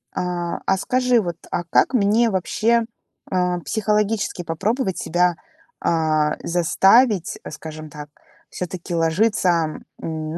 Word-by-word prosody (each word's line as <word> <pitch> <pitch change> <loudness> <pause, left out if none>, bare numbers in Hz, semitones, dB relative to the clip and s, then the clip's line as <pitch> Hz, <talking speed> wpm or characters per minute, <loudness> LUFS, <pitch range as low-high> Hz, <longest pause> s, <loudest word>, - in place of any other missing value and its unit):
А, 175 -1 -2
а 190 - +2
скажи, 250 +2 +2
вот, 175 -3 -4 0.2
а 175 - -1
как - - +3
мне 225 +1 +3
вообще, 230 +5 +1 0.5
а, 180 -1 +1
психологически 210 -2 -1
попробовать 190 - -1
себя, 175 0 +1 0.5
а, 155 -2 +1
заставить, 190 +4 +3
скажем 155 0 -8
так, 150 0 -9 0.4
всё-таки 180 -1 -5
ложиться, 180 +4 +2
а, 170 -2 +3 0.4
м, 160 0 -4
180 Hz, 115 wpm, -21 LUFS, 165-215 Hz, 0.5 s, как